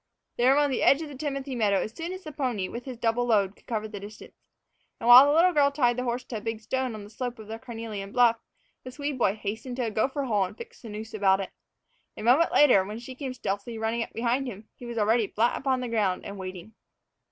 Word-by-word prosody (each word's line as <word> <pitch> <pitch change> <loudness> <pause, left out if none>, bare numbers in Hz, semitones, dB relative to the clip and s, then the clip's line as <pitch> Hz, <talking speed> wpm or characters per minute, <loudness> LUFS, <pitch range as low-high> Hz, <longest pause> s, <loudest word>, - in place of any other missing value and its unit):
They 240 - +1
were 275 - +5
on 290 -1 +3
the 260 - -1
edge 280 +4 +4
of 310 - -7
the 285 - -9
timothy 275 -1 -4
meadow 210 -4 +2
as 215 - -4
soon 335 +2 -5
as 370 0 -7
the 310 - -7
pony, 245 -9 -2
with 235 +4 -7
his 255 -3 -7
double 240 +1 0
load, 205 -4 +2
could - - -26
cover 220 -2 -2
the 210 -2 -8
distance. 205 +2 -11 0.7
And 230 - -4
while 250 +3 +10
the - - +3
little 355 +2 +5
girl 285 -2 +4
tied 255 -4 +2
the 250 +1 -3
horse 245 +1 -2
to 240 - -6
a - - -7
big 225 0 -4
stone 255 +2 -2
on 210 - -8
the 205 - -12
slope 245 +2 -5
of 220 -2 -11
the 225 +1 -6
carnelian 225 -4 -7
bluff, 240 -1 +4 0.5
the 255 - -7
Swede 285 0 -4
boy 200 -3 +2
hastened 220 +4 -5
to 255 - -2
a 225 - -2
gopher 265 +6 0
hole 210 -7 +1
and 185 - -10
fixed 470 0 -11
the 230 - -9
noose 220 +1 -7
about 195 -2 +3
it. 195 - -5 0.7
A - - -6
moment 260 +9 +4
later, 250 -10 +6
when 210 +3 -6
she 245 +2 -8
came 255 -1 -6
stealthily 205 +1 -4
running 225 +1 -1
up - - -4
behind 245 +3 -1
him, 215 -2 -8
he 245 - -11
was 235 -1 -6
already 220 +1 +2
flat 230 +5 +1
upon 265 -2 0
the 250 - -3
ground 210 -5 0
and 200 0 -7
waiting. 185 +2 -8
235 Hz, 260 wpm, -27 LUFS, 215-260 Hz, 0.7 s, while